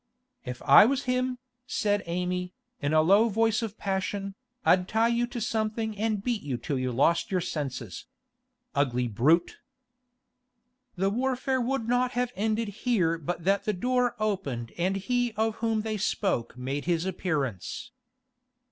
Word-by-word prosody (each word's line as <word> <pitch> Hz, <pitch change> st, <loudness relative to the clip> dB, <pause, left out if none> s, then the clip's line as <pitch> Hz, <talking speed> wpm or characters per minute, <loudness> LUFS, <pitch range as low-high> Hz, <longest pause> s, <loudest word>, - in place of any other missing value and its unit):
'If 125 Hz, -1 st, -6 dB
I 145 Hz, +9 st, +8 dB
was 275 Hz, +1 st, 0 dB
him,' 255 Hz, 0 st, 0 dB, 0.3 s
said 205 Hz, -4 st, +1 dB
Amy, 180 Hz, +1 st, -2 dB, 0.3 s
in 145 Hz, -, 0 dB
a 155 Hz, 0 st, +5 dB
low 200 Hz, +7 st, +5 dB
voice 225 Hz, +1 st, +2 dB
of 220 Hz, -1 st, -5 dB
passion, 195 Hz, 0 st, -2 dB, 0.3 s
'I'd 180 Hz, 0 st, +4 dB
tie 225 Hz, +2 st, +2 dB
you 235 Hz, 0 st, +1 dB
to 240 Hz, 0 st, -5 dB
something 220 Hz, -1 st, -1 dB
and 215 Hz, -1 st, -1 dB
beat 235 Hz, -3 st, -1 dB
you 135 Hz, -4 st, -3 dB
till 130 Hz, +3 st, -3 dB
you 130 Hz, 0 st, -1 dB
lost 140 Hz, +7 st, +2 dB
your 185 Hz, -, +1 dB
senses. 135 Hz, -, -5 dB, 0.7 s
Ugly 125 Hz, -3 st, +1 dB
brute!' 155 Hz, +11 st, +2 dB, 1.4 s
The 195 Hz, +2 st, +1 dB
warfare 260 Hz, +2 st, 0 dB
would 245 Hz, -1 st, -1 dB
not 245 Hz, +1 st, +1 dB
have 245 Hz, 0 st, 0 dB
ended 215 Hz, +2 st, 0 dB
here 195 Hz, -6 st, 0 dB
but 165 Hz, +2 st, -4 dB
that 195 Hz, +3 st, +2 dB
the 210 Hz, -, +1 dB
door 250 Hz, +4 st, +1 dB
opened 145 Hz, -, -2 dB
and 185 Hz, +3 st, 0 dB
he 245 Hz, +4 st, 0 dB
of 220 Hz, 0 st, 0 dB
whom 225 Hz, -1 st, 0 dB
they 215 Hz, 0 st, -2 dB
spoke 190 Hz, -, -1 dB
made 135 Hz, +3 st, -3 dB
his 170 Hz, 0 st, +1 dB
appearance. 160 Hz, -, -3 dB
200 Hz, 155 wpm, -28 LUFS, 165-230 Hz, 1.4 s, I